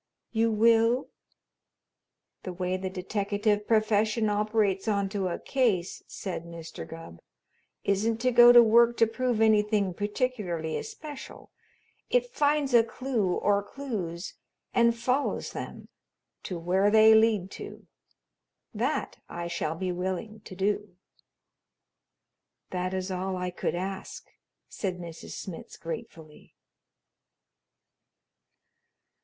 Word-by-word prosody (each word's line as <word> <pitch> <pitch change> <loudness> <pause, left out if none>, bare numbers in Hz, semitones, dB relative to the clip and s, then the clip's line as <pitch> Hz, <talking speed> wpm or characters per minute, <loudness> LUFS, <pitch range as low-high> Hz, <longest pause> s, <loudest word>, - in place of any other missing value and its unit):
You 225 0 +2
will?" 230 +3 +3 1.3
"The 185 - -6
way 180 +1 -2
the 185 0 -3
deteckative 205 +2 -1
profession 215 0 +2
operates 210 -1 +1
onto 200 -2 0
a 175 - -2
case," 220 -10 0
said 185 -4 -5
Mr. 170 -1 -9
Gubb, 165 - -10 0.6
"isn't 210 +3 +1
to 255 +1 +2
go 240 0 +9
to 240 -1 +9
work 235 +1 +5
to 230 - +5
prove 235 0 -1
anything 210 -3 +3
particularly 205 -6 -2
especial. 310 -11 -8 0.6
It - - +1
finds 290 - +1
a 235 -1 +7
clue 230 -5 -1
or 205 0 +2
clues 200 -8 -5 0.4
and 235 0 +3
follows 255 +4 -1
them - - -7 0.6
to 180 - -4
where 185 +4 +2
they 220 +1 +7
lead 220 -4 +3
to. - - -9 0.9
That - - -2
I 170 0 -5
shall 165 -2 -2
be 185 +2 -2
willing 190 +4 -4
to 185 - -9
do." 200 0 -1 1.8
"That 185 +1 -2
is 185 0 -3
all 185 0 -2
I 180 0 -3
could 175 - -2
ask," 190 +2 -5 0.4
said 185 -3 -4
Mrs. 170 -2 -9
Smitz 185 -4 -8
gratefully. 160 -2 -9
205 Hz, 115 wpm, -28 LUFS, 185-230 Hz, 1.8 s, go